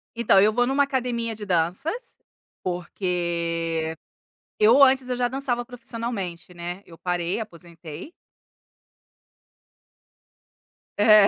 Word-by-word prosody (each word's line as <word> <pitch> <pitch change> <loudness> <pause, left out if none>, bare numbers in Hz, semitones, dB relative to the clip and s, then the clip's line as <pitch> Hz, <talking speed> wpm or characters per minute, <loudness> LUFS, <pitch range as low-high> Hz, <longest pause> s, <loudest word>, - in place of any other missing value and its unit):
Então, 230 -4 +5
eu 215 +1 +5
vou 245 +2 +2
em 250 - -1
uma 285 +1 +4
academia 245 -4 -1
de 210 -1 -7
danças 195 - -1 0.5
porque 170 -3 -1 0.7
eu 230 +6 +7
antes 260 -1 +5
eu 250 - -1
já 245 0 +1
dançava 250 -2 0
profissionalmente, 225 -8 -5
né. 175 +2 -6
Eu 165 - -13
parei, 175 +2 -1
aposentei. 170 - -9 2.9
É, 210 -1 +7
205 Hz, 105 wpm, -25 LUFS, 170-245 Hz, 2.9 s, eu